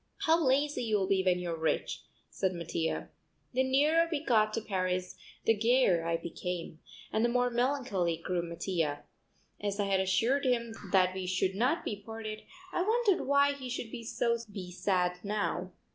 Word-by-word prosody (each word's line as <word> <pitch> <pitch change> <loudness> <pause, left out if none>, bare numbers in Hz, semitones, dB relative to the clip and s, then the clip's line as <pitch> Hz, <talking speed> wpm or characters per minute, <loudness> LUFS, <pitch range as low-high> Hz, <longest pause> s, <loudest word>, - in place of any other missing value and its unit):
"How 325 +1 +4
lazy 285 +2 +2
you'll 210 -3 +1
be 190 0 +2
when 180 -1 +3
you're 175 -2 -3
rich," 160 0 -1 0.3
said 190 -1 0
Mattia. 170 -1 -3 0.4
The 255 - +2
nearer 295 +6 +3
we 310 -1 -2
got 215 -4 +3
to - - 0
Paris 185 -3 -2 0.3
the 225 - +5
gayer 225 -6 +3
I 165 0 0
became; 170 -1 -5 0.3
and 220 - +2
the 240 - +3
more 245 0 +2
melancholy 240 -9 0
grew 175 +1 -2
Mattia. 170 -3 -2 0.6
As 205 0 -2
I 205 - +2
had 195 -1 +2
assured 225 +9 +2
him 235 -3 +1 0.2
that 185 -1 +4
we 185 -1 -4
should 185 +1 +1
not 250 - +1
be 205 -1 -3
parted 220 0 -6 0.3
I - - +1
wondered 435 -1 +2
why 280 0 +4
he 265 -3 -7
should 240 -2 -4
be 235 -2 -6 0.7
sad 180 -1 0
now. 200 -3 -2
210 Hz, 165 wpm, -31 LUFS, 180-255 Hz, 0.7 s, the